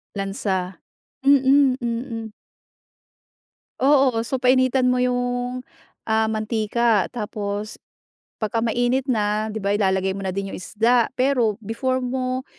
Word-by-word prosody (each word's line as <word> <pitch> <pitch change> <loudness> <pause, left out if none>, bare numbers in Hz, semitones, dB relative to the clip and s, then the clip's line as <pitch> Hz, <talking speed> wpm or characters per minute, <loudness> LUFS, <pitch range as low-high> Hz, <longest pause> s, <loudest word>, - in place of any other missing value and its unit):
Lansa. 195 -2 -3 0.5
Mm, 275 -1 +5
Mm. 230 -1 -4 1.5
Oo. 265 -4 +3
So, 260 0 -3
painitan 255 0 +3
mo 250 - +1
'yong 245 0 -1 0.4
ah, 220 0 +1
mantika. 220 -1 +1
Tapos 210 -1 -4 0.6
pagka 225 +1 -1
mainit 245 +3 0
na, 215 -2 0
'di 215 - -7
ba, 200 - +1
ilalagay 190 -2 +1
mo 195 - -6
na 190 - -3
din 195 0 -3
'yong - - -6
isda. 230 +5 +2
Pero, 250 -5 +2
before 255 +4 -1
mo 255 +1 -2
235 Hz, 120 wpm, -22 LUFS, 210-255 Hz, 1.5 s, Mm